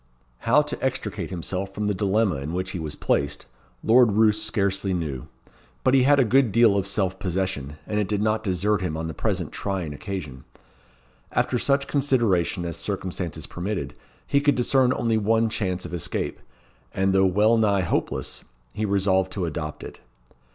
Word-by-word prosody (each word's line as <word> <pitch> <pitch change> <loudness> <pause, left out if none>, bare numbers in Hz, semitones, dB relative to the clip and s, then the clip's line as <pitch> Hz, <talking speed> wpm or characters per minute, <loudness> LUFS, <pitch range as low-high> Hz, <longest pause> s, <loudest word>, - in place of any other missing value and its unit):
How 150 +5 +6
to 150 - -6
extricate 125 -9 -2
himself 95 +2 -4
from 105 - -2
the 105 - +1
dilemma 100 -2 +1
in 70 +4 -5
which 95 +1 -2
he 90 - -4
was 80 -2 -5
placed, 70 0 -1 0.4
Lord 120 -1 +5
Roos 110 0 +3
scarcely 100 -3 0
knew. 75 -7 -4 0.6
But - - +3
he 135 - +6
had 140 +2 +5
a - - +6
good 130 0 +3
deal 115 -1 +5
of 100 -1 0
self 95 -1 -1
possession, 90 -6 -3
and 105 - -1
it 105 - 0
did 105 0 -1
not 110 +1 0
desert 100 +1 0
him 80 -4 -2
on 80 +1 -3
the 80 - -5
present - - -2
trying 95 -6 -3
occasion. 75 -6 -6 0.9
After 125 - +1
such 140 +2 +1
consideration 115 - +1
as 85 - -4
circumstances 95 -4 -4
permitted, 90 -6 -4 0.3
he 140 - +2
could 145 -1 +3
discern 125 +1 +3
only 115 -3 +1
one 110 +2 +2
chance 95 -4 -2
of - - -8
escape, 85 - -2 0.6
and 95 0 +2
though 95 0 +4
well 105 +5 +4
nigh 105 -3 +3
hopeless, 90 - -2 0.3
he 110 - -2
resolved 95 -2 +1
to 95 -3 -2
adopt 75 -2 -5
it. - - -10
100 Hz, 175 wpm, -24 LUFS, 90-110 Hz, 0.9 s, How